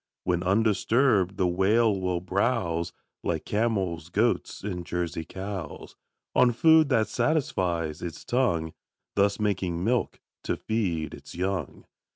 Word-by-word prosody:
When 90 Hz, -1 st, 0 dB
undisturbed, 100 Hz, 0 st, +2 dB
the 95 Hz, -, +2 dB
Whale 100 Hz, +5 st, +3 dB
will 90 Hz, -2 st, -1 dB
browse 90 Hz, -3 st, 0 dB, 0.3 s
Like 80 Hz, -2 st, -2 dB
camels, 95 Hz, -7 st, -1 dB
goats, 110 Hz, +3 st, 0 dB
and 90 Hz, -4 st, -3 dB
Jersey 85 Hz, -2 st, -3 dB
cows, 95 Hz, -1 st, -7 dB, 0.4 s
On 125 Hz, -1 st, +5 dB
food 160 Hz, +4 st, +5 dB
that 115 Hz, -5 st, +3 dB
satisfies 90 Hz, -, 0 dB
its 85 Hz, -4 st, -6 dB
tongue, 85 Hz, -11 st, 0 dB, 0.4 s
Thus 100 Hz, +1 st, +2 dB
making 95 Hz, -5 st, -1 dB
milk 120 Hz, +3 st, 0 dB, 0.3 s
to -, -, -1 dB
feed 90 Hz, -9 st, -2 dB
its -, -, -11 dB
young. 90 Hz, -4 st, -3 dB
95 Hz, 125 wpm, -27 LUFS, 85-110 Hz, 0.4 s, On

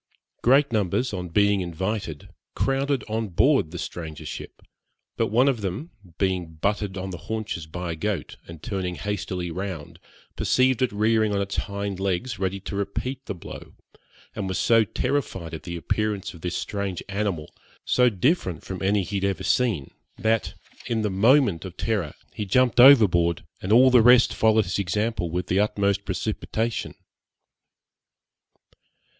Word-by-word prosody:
Great 135 Hz, +3 st, +4 dB
numbers, 105 Hz, +4 st, 0 dB
on 90 Hz, -2 st, -4 dB
being 100 Hz, +2 st, +3 dB
invited, 90 Hz, -2 st, -4 dB, 0.3 s
crowded 135 Hz, 0 st, 0 dB
on 110 Hz, 0 st, -2 dB
board 85 Hz, -3 st, +3 dB
the -, -, -7 dB
stranger 80 Hz, -3 st, -6 dB
ship, -, -, -8 dB, 0.5 s
but -, -, +1 dB
one 120 Hz, +6 st, +3 dB
of 130 Hz, -6 st, +1 dB
them, 100 Hz, -, -4 dB, 0.3 s
being 90 Hz, -4 st, -1 dB
butted 100 Hz, +3 st, -1 dB
on 95 Hz, 0 st, -4 dB
the 85 Hz, -, -7 dB
haunches 110 Hz, -7 st, -3 dB
by 90 Hz, +2 st, -5 dB
a -, -, -3 dB
goat, 105 Hz, +4 st, -3 dB
and 85 Hz, -2 st, -11 dB
turning 95 Hz, -5 st, -3 dB
hastily 95 Hz, -3 st, -3 dB
round, 90 Hz, -4 st, -6 dB, 0.4 s
perceived 130 Hz, -1 st, +2 dB
it 130 Hz, -, +2 dB
rearing 110 Hz, 0 st, +2 dB
on -, -, +1 dB
its 100 Hz, 0 st, -3 dB
hind 100 Hz, -2 st, -3 dB
legs, 100 Hz, +4 st, -2 dB
ready 95 Hz, 0 st, -1 dB
to 100 Hz, -, -6 dB
repeat 120 Hz, +7 st, -3 dB
the 100 Hz, -, -3 dB
blow, 85 Hz, -, -10 dB, 0.6 s
was 95 Hz, -1 st, -2 dB
so 115 Hz, -1 st, +4 dB
terrified 105 Hz, -, -2 dB
at 80 Hz, -, -5 dB
the 85 Hz, +3 st, -6 dB
appearance 105 Hz, +3 st, -2 dB
of 85 Hz, -, -13 dB
this 90 Hz, +1 st, -2 dB
strange 100 Hz, -3 st, -3 dB
animal, 100 Hz, -6 st, -3 dB, 0.3 s
so 125 Hz, 0 st, +4 dB
different 105 Hz, -, 0 dB
from 95 Hz, -2 st, -6 dB
any 100 Hz, +1 st, +2 dB
he 100 Hz, +2 st, -3 dB
had 95 Hz, -, -3 dB
ever 100 Hz, -1 st, -1 dB
seen, 110 Hz, -, +1 dB, 0.3 s
that, 110 Hz, 0 st, 0 dB, 0.3 s
in 115 Hz, -3 st, 0 dB
the 105 Hz, -, 0 dB
moment 105 Hz, -, +4 dB
of 95 Hz, -2 st, -9 dB
terror, 100 Hz, -9 st, -1 dB, 0.2 s
he 105 Hz, -, -4 dB
jumped 125 Hz, +4 st, +2 dB
overboard, 95 Hz, -, +6 dB, 0.2 s
and 95 Hz, -, -3 dB
all 130 Hz, +3 st, +7 dB
the 125 Hz, -2 st, +7 dB
rest 125 Hz, +1 st, +6 dB
followed 110 Hz, -1 st, +3 dB
his 90 Hz, -, -2 dB
example 100 Hz, 0 st, -1 dB
with 90 Hz, +2 st, -2 dB
the 95 Hz, +2 st, +1 dB
utmost 100 Hz, -1 st, +1 dB
precipitation. 110 Hz, +4 st, -2 dB
100 Hz, 160 wpm, -25 LUFS, 90-110 Hz, 0.6 s, all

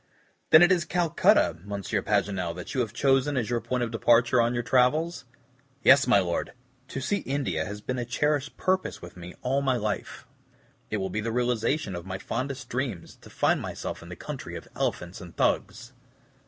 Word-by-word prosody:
"Then 155 Hz, +2 st, +9 dB
it 175 Hz, -, +5 dB
is 175 Hz, -2 st, +3 dB
Calcutta, 165 Hz, -, +3 dB
M. 100 Hz, -, -16 dB
Paganel, 100 Hz, -3 st, -1 dB
that 90 Hz, -, -7 dB
you 130 Hz, -, -1 dB
have 115 Hz, -4 st, -2 dB
chosen 135 Hz, +1 st, +2 dB
as 120 Hz, -1 st, -1 dB
your 120 Hz, -1 st, 0 dB
point 125 Hz, -1 st, -1 dB
of 115 Hz, -, -3 dB
departure 120 Hz, +1 st, +4 dB
on 120 Hz, +1 st, +1 dB
your 120 Hz, -, -1 dB
travels?" 130 Hz, +5 st, +2 dB, 0.6 s
"Yes, 140 Hz, 0 st, +7 dB
my 125 Hz, -, +6 dB
Lord, 90 Hz, -3 st, -1 dB, 0.3 s
to 135 Hz, -, -5 dB
see 200 Hz, +10 st, 0 dB
India 130 Hz, -, -2 dB
has 105 Hz, +3 st, -6 dB
been 125 Hz, +2 st, -3 dB
a -, -, -1 dB
cherished 145 Hz, +4 st, -1 dB
purpose 185 Hz, 0 st, 0 dB
with 85 Hz, -, -11 dB
me 90 Hz, 0 st, -10 dB
all 135 Hz, +2 st, +1 dB
my 135 Hz, -2 st, +1 dB
life. 105 Hz, -3 st, -3 dB, 0.6 s
It 110 Hz, -, -1 dB
will 95 Hz, -2 st, -3 dB
be 110 Hz, -, -2 dB
the 115 Hz, +1 st, -2 dB
realization 120 Hz, 0 st, 0 dB
of 85 Hz, +1 st, -7 dB
my 95 Hz, 0 st, -4 dB
fondest 130 Hz, +6 st, -4 dB
dreams, 120 Hz, -8 st, -4 dB
to -, -, -16 dB
find -, -, +1 dB
myself -, -, -5 dB
in -, -, -11 dB
the -, -, -7 dB
country -, -, -7 dB
of -, -, -8 dB
elephants 85 Hz, +2 st, -3 dB
and 90 Hz, -2 st, -12 dB
Thugs." 120 Hz, +3 st, 0 dB
120 Hz, 195 wpm, -27 LUFS, 100-135 Hz, 0.6 s, Then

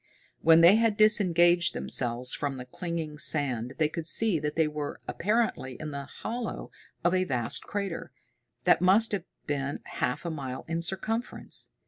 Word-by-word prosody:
When 165 Hz, 0 st, +6 dB
they 175 Hz, +5 st, +7 dB
had 225 Hz, -2 st, +2 dB
disengaged 175 Hz, -5 st, +4 dB
themselves 125 Hz, 0 st, +3 dB
from 140 Hz, -2 st, -3 dB
the 125 Hz, -, -7 dB
clinging 160 Hz, +1 st, -5 dB
sand 130 Hz, -6 st, 0 dB
they 155 Hz, -, +2 dB
could 160 Hz, +1 st, -6 dB
see 210 Hz, -3 st, +2 dB
that 150 Hz, 0 st, -3 dB
they 160 Hz, -1 st, +2 dB
were 150 Hz, -1 st, -5 dB
apparently 170 Hz, -, -1 dB
in 155 Hz, -1 st, -5 dB
the 140 Hz, -1 st, -5 dB
hollow 230 Hz, -, -6 dB, 0.3 s
of 175 Hz, +1 st, +2 dB
a 185 Hz, 0 st, +2 dB
vast 125 Hz, -8 st, -1 dB
crater, 200 Hz, -4 st, -4 dB, 0.5 s
that -, -, +4 dB
must 200 Hz, +5 st, +4 dB
have 195 Hz, -5 st, -2 dB, 0.2 s
been 140 Hz, -1 st, -3 dB
half 125 Hz, -, -3 dB
a 170 Hz, -, -2 dB
mile 130 Hz, -4 st, -6 dB
in 165 Hz, +1 st, -2 dB
circumference. 220 Hz, +7 st, -3 dB
165 Hz, 160 wpm, -28 LUFS, 140-190 Hz, 0.5 s, they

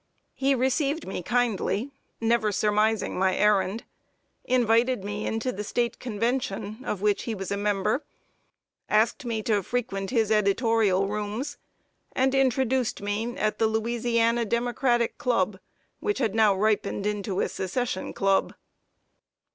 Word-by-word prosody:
He 275 Hz, 0 st, +1 dB
received 275 Hz, +4 st, 0 dB
me 190 Hz, -, -4 dB
kindly, 240 Hz, +2 st, 0 dB, 0.3 s
never 230 Hz, -2 st, +2 dB
surmising 210 Hz, 0 st, +1 dB
my 190 Hz, 0 st, +2 dB
errand; 210 Hz, +1 st, +2 dB, 0.6 s
invited 245 Hz, -2 st, +2 dB
me 205 Hz, +1 st, -4 dB
into 225 Hz, +3 st, -1 dB
the 210 Hz, -1 st, -5 dB
State 235 Hz, +3 st, -1 dB
convention, 225 Hz, -2 st, -2 dB
of 205 Hz, -5 st, -3 dB
which 210 Hz, -1 st, +1 dB
he 230 Hz, -, -2 dB
was 195 Hz, -1 st, -5 dB
a -, -, +1 dB
member; 205 Hz, +5 st, 0 dB, 0.9 s
asked 225 Hz, +6 st, +2 dB
me 225 Hz, -2 st, -2 dB
to 210 Hz, -2 st, +1 dB
frequent 195 Hz, -3 st, -3 dB
his 225 Hz, -4 st, +1 dB
editorial 210 Hz, -2 st, +2 dB
rooms; 210 Hz, +8 st, -4 dB, 0.5 s
and 265 Hz, +1 st, +2 dB
introduced 260 Hz, -2 st, +1 dB
me 210 Hz, +4 st, -3 dB
at 215 Hz, 0 st, -1 dB
the 225 Hz, -, +4 dB
"Louisiana 230 Hz, +1 st, +1 dB
Democratic 240 Hz, +1 st, 0 dB
Club," 200 Hz, -6 st, 0 dB, 0.4 s
which 415 Hz, -, -1 dB
had 225 Hz, -7 st, 0 dB
now 215 Hz, -3 st, +4 dB
ripened 205 Hz, 0 st, 0 dB
into 205 Hz, -2 st, -2 dB
a -, -, +1 dB
Secession 195 Hz, +2 st, -3 dB
club. 195 Hz, 0 st, +1 dB
220 Hz, 130 wpm, -26 LUFS, 205-245 Hz, 0.9 s, the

